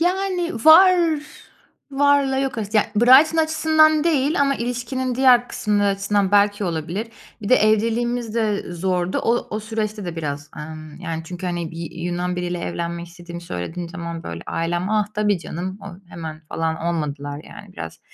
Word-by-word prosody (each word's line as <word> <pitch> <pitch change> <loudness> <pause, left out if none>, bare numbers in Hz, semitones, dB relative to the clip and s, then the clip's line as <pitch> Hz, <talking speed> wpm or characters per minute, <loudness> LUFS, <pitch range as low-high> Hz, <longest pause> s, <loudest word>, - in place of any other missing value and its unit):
yani, 360 -1 0
var 335 -2 +7 0.7
varla 280 -1 +3
yok 270 -3 -2
arası. 210 0 -2
Yani, 210 - +4
Brighton 265 +8 +6
açısından 315 -1 +3
değil 300 -1 +2
ama 275 -1 +3
ilişkinin 245 +1 -3
diğer 250 -1 +5
kısımları 205 -1 0
açısından 200 0 0
belki 205 0 +3
olabilir. 175 +6 -3 0.3
Bir 200 - -4
de 255 - +6
evliliğimiz 230 +2 +1
de 215 -3 +1
e - - -6
zordu. 180 +1 -1
O 235 +1 0
o - - -3
süreçte 215 -2 -3
de 175 -1 -5
biraz, 150 -1 -4
ımm, 155 0 -9
yani, 165 -3 -4
çünkü, 180 +2 -6
hani, 175 -2 -3
bir 165 0 -6
Yunan 175 +1 -3
biriyle 175 0 -2
evlenmek 170 0 -4
istediğimi 175 0 -10
söylediğim 170 - -5
zaman, 170 -2 -6
böyle, 85 0 -6
ailem, 175 +3 -2
"Ah, 215 -1 +2
tabii 210 -2 +1
canım, 180 +3 -6
o" - - -9 0.2
hemen 160 -2 -7
falan 160 0 -2
olmadılar, 150 -4 -3
yani, - - -12
biraz. - - -8
205 Hz, 160 wpm, -21 LUFS, 170-255 Hz, 0.7 s, var